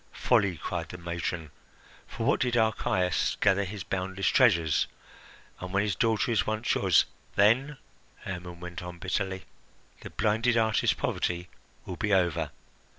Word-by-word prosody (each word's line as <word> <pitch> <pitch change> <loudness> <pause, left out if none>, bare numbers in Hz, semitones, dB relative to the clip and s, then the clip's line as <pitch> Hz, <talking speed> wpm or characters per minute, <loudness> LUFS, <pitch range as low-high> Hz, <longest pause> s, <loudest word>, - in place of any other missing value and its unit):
"Folly!" 95 -4 +2
cried 85 0 -4
the 90 - -7
matron. 85 -2 -4 0.6
"For 115 - -5
what 140 - +3
did 125 -2 +1
Archias 95 -5 +1
gather 100 +1 +3
his 100 +1 -6
boundless 95 0 -3
treasures? 80 -3 +3 0.7
And 90 0 -6
when 100 +2 +2
his 105 -2 -1
daughter 115 +2 +1
is 110 -4 +1
once 110 +2 0
yours - - +4
" - - -32
"Then," 125 +8 +3 0.4
Hermon 90 -2 -7
went 90 0 -7
on 90 0 -8
bitterly, 95 +1 -3 0.5
"the - - -9
blinded 110 +3 +1
artist's 110 -1 +2
poverty 90 0 -2 0.4
will 90 - -6
be 105 -2 +2
over. 90 -5 +1
95 Hz, 150 wpm, -28 LUFS, 90-110 Hz, 0.7 s, yours